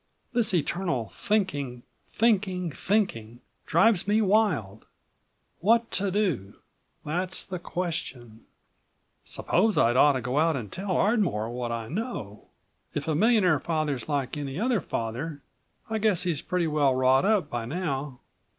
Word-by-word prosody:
This 235 -4 +2
eternal 170 - -1
thinking—thinking—thinking, 180 - -1 0.3
drives 195 +2 +3
me 210 +1 +3
wild. 190 - +1 0.7
What 230 +5 +3
to 200 +1 +1
do, 175 - -1 0.5
that's 180 +5 -2
the 185 -2 -5
question. 140 -11 -5 0.8
Suppose 220 -1 +1
I'd 120 +1 +4
ought 145 +2 +6
to 130 - -2
go 125 +5 -1
out 160 0 +3
and 115 -7 -5
tell 185 -1 -2
Ardmore 190 - +1
what 120 -1 -3
I 115 -1 -4
know. 155 - -5 0.5
If - - -3
a 160 - +1
millionaire 185 - +4
father's 155 -4 -2
like 140 -2 -1
any 145 +1 -4
other 235 -3 +1
father, 130 +7 -4 0.4
I 220 0 -2
guess 205 -5 +2
he's 170 -6 -1
pretty 180 -2 -1
well 150 -4 +2
wrought 130 +1 +4
up 200 -6 +2
by 120 -1 -3
now. 140 -3 -3
160 Hz, 130 wpm, -27 LUFS, 130-195 Hz, 0.8 s, ought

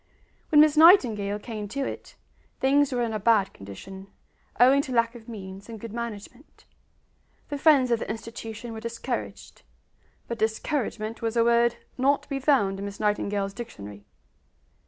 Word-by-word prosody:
When 300 -2 +7
Miss 305 0 +4
Nightingale 240 - +5
came 210 -1 -6
to 270 +6 -3
it, - - -7 0.4
things 280 +1 +3
were 245 -1 0
in 230 -1 -2
a 215 - -2
bad 205 -2 +2
condition, 190 - -10 0.5
owing 265 +3 +6
to 275 - -7
lack 230 -1 +2
of 240 -1 -13
means 195 -1 -9
and 225 -1 -8
good 230 0 -8
management. 235 +3 -8 0.8
The 285 - -4
friends 275 -5 +4
of 235 - +2
the - - -6
institution 225 +1 -7
were 220 - -6
discouraged; 230 +1 -6 0.7
but 235 -1 -5
discouragement, 220 0 -2
was 230 0 -2
a 230 - +5
word 235 0 +3 0.2
not 280 +2 +2
to - - -21
be 275 -1 -2
found 245 -9 +2
in 200 - -5
Miss 200 0 -7
Nightingale's 205 -1 -1
dictionary. 105 - -9
230 Hz, 160 wpm, -26 LUFS, 205-255 Hz, 0.8 s, When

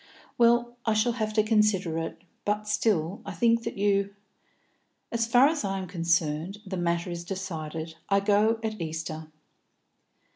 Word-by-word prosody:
"Well, 240 0 +3
I 220 -1 +1
shall 215 +3 +3
have 220 -2 -2
to 215 -1 +3
consider 210 -6 +2
it. 165 +1 -6 0.2
But 210 0 0
I - - -18
still 205 -4 0
think 230 +6 +3
that 230 -2 -5
you 200 0 +1 0.5
" - - -45
"As 230 -1 0
far 245 +3 +6
as 310 -3 -1
I 195 -1 -1
am 190 -1 -4
concerned, 170 0 0
the 190 -1 -4
matter 170 0 -1
is 170 0 -5
decided. 165 -4 -5 0.2
I 200 0 +4
go 210 +3 +3
at 215 -3 -3
Easter." 160 -1 -4
200 Hz, 160 wpm, -27 LUFS, 170-220 Hz, 0.5 s, far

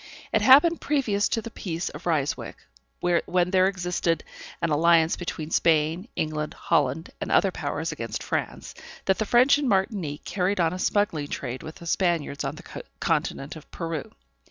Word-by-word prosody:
It - - +3
happened 295 +6 +6
previous 230 -9 +1
to 225 - -1
the 230 - -7
peace 170 -4 -4
of - - -9
Ryswick, 150 -4 -1 0.4
when 175 +1 +1
there 185 -1 +4
existed 180 -3 -1 0.4
an 165 - -1
alliance 165 +1 +4
between 165 -3 -5
Spain, 165 +4 +2
England, 155 -1 -2
Holland, 145 +4 0
and - - -3
other - - +4
powers, - - -3
against - - -5
France, - - -3 0.3
that 190 - +2
the 220 - -1
French 255 +6 +5
in 285 - -1
Martinique 190 - -1
carried 190 +1 0
on 165 -1 +2
a 185 - -5
smuggling 200 -8 0
trade 130 -3 -5
with 155 - -8
the 170 - -12
Spaniards 170 -5 0
on - - -3
the - - -12 0.4
continent 140 +4 -1
of 160 - -12
Peru. 165 -4 -5
175 Hz, 165 wpm, -26 LUFS, 155-200 Hz, 0.4 s, happened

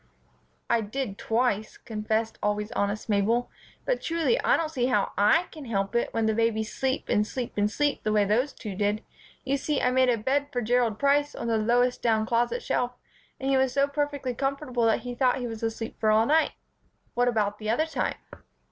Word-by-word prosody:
"I 235 -1 +2
did 215 -1 -4
twice," 225 -2 0
confessed 220 0 -2
always 210 +1 -1
honest 205 -1 -2
Mabel; 220 +3 +1 0.3
"but - - 0
truly 335 +8 +1
I - - +4
don't 320 -2 -2
see 250 -5 0
how 210 -6 +1
I 210 - +4
can 305 -3 -9
help 195 -3 -1
it 235 - +1
when 225 -1 0
babies 220 -1 0
sleep 265 0 -1
and 210 - +2
sleep 250 0 -4
and 205 0 +2
sleep 290 +5 0
the 215 - -1
way 210 -1 +3
those 240 +8 +1
two 210 -5 -7
did. 205 +2 -1 0.4
You 275 +1 0
see, 290 +1 -1
I 250 - +2
made 255 0 +3
a 240 - +3
bed 275 +6 0
for 245 - -1
Gerald 235 -1 +1
Price 285 +2 +2
on - - -5
the 230 -1 +1
lowest 245 +3 +2
down 220 -2 +2
closet 240 +1 0
shelf, 245 0 -1 0.5
and 270 +1 -1
he 270 - +4
was 265 -1 +2
so 280 0 +3
perfectly 285 -3 -2
comfortable 270 -2 -1
that 225 - +2
he 245 0 -5
thought 250 0 +2
he 250 - -3
was 225 -2 -6
asleep 225 0 -4
for 215 - +2
all 215 +1 +4
night." 315 +5 +3 0.6
"What 245 +1 +2
about 210 -3 0
the 215 0 -4
other 275 +8 +2
time?" 320 - -2
240 Hz, 205 wpm, -27 LUFS, 215-270 Hz, 0.6 s, I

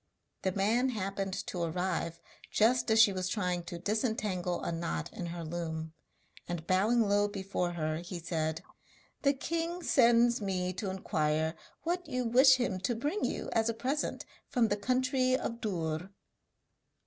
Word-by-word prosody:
The 190 - +1
man 225 +7 +2
happened 195 -4 -2
to 180 - -4
arrive 170 0 -1 0.3
just 240 +3 +3
as 220 0 +4
she 215 -3 +7
was 185 -1 -2
trying 180 -4 -1
to 175 - -6
disentangle 205 -3 -1
a - - -1
knot 80 - -3
in 175 - -5
her 170 0 -5
loom, 160 -1 -4 0.5
and 175 -2 -4
bowing 210 +7 +3
low 205 +1 +3
before 190 -3 -2
her, 155 -2 -1
he 175 +2 -6
said: 160 -2 -2 0.6
'The 280 0 +4
king 335 +5 -3
sends 235 -3 +4
me 185 -2 -1
to 195 +2 -3
inquire 160 -4 0 0.3
what 350 +1 -1
you 255 -2 -1
wish 260 +3 +7
him 240 -7 -1
to 210 +6 -1
bring 295 - -2
you - - -2
as 225 0 +2
a 230 - -1
present 265 +6 -2 0.2
from 235 -3 +2
the 205 - +2
country 255 +3 +2
of 235 -2 -4
Dûr?' 170 -3 -2
195 Hz, 160 wpm, -31 LUFS, 175-240 Hz, 0.6 s, she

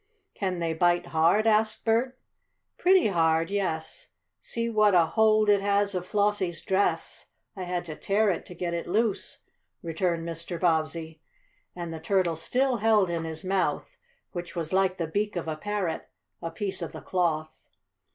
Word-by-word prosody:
"Can 185 -3 -2
they 165 -1 -1
bite 175 +1 +2
hard?" 170 +7 +4
asked 215 0 +2
Bert. 240 +3 +1 0.6
"Pretty 370 - +5
hard, 165 -1 +2
yes. 165 -6 -3 0.3
See 230 0 -3
what 215 -3 +3
a 170 -2 +6
hold 215 +3 +3
it 205 -1 +4
has 200 0 +1
of 180 -1 -3
Flossie's 200 -4 0
dress. 190 -4 0 0.3
I 185 -2 -5
had 175 0 -3
to 155 -3 -6
tear 205 +5 +2
it 175 - -3
to 180 - -10
get 170 0 -3
it 170 - -3
loose," 210 +2 -1 0.4
returned 170 0 -1
Mr. 170 +1 -5
Bobbsey. 160 -1 0 0.5
And 170 -2 -5
the 160 - -6
turtle 185 -1 +1
still 250 +10 0
held 210 -4 +3
in 165 -1 -2
his 160 -1 -6
mouth, 195 - -1 0.3
which 175 -1 -6
was 165 0 -3
like 190 -1 +2
the 170 - -1
beak 205 +6 -2
of 175 -2 -3
a 160 - -2
parrot, 195 -1 -3 0.3
a 165 - -3
piece 190 +3 -4
of - - -5
the - - -8
cloth. 160 -4 -2
180 Hz, 170 wpm, -27 LUFS, 165-205 Hz, 0.6 s, a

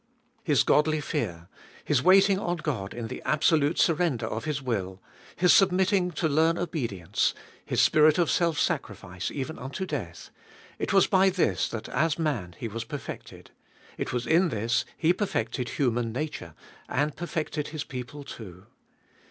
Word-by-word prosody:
His 150 -9 +3
godly 155 +1 +3
fear, 90 - -3 0.4
His 145 -4 +2
waiting 195 +3 +5
on 175 -2 -2
God 125 -12 -3
in 120 -1 -5
the 125 - -7
absolute 150 0 +2
surrender 155 -8 +2
of 110 +1 -4
His 150 -2 -1
will, 100 -8 -3 0.4
His 180 0 +5
submitting 190 -1 +3
to 160 +2 0
learn 160 +3 +2
obedience, 110 - -1 0.3
His - - +1
spirit 155 0 +5
of 175 -2 +2
self 170 -3 +1
sacrifice, 90 +1 -2
even 145 +3 -5
unto 135 +9 -5
death, 120 - -6 0.2
— - - -22
it - - -2
was 195 -2 +5
by 190 0 +4
this 185 -1 0
that 115 - -6
as 155 +4 0
man 120 - -2
He 115 - -4
was 115 +1 -5
perfected, 140 +4 -8 0.4
it - - -4
was 125 -1 -2
in 170 +3 +3
this 115 0 0
He 170 +1 +3
perfected 125 - -2
human 120 -4 0
nature, 125 - -5 0.3
and 145 +2 0
perfected 155 -3 -3
His 155 -2 -5
people 130 +2 -7
too. 95 -8 -10
150 Hz, 160 wpm, -27 LUFS, 115-165 Hz, 0.4 s, waiting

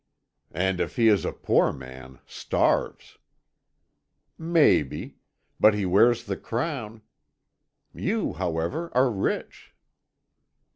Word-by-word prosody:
"And 95 +1 0
if - - -3
he 115 -2 +4
is 105 -2 +2
a - - -1
poor - - +1
man, 65 0 -11
starves." - - -1 1.2
"Maybe; 160 - +1 0.4
but 110 0 +5
he 100 -2 -1
wears 115 +6 +3
the 100 -1 -4
crown. 115 -4 -4 0.9
You, 215 +3 -2
however, 90 - -3
are 125 0 +3
rich." 100 -3 -4
105 Hz, 100 wpm, -25 LUFS, 90-130 Hz, 1.2 s, but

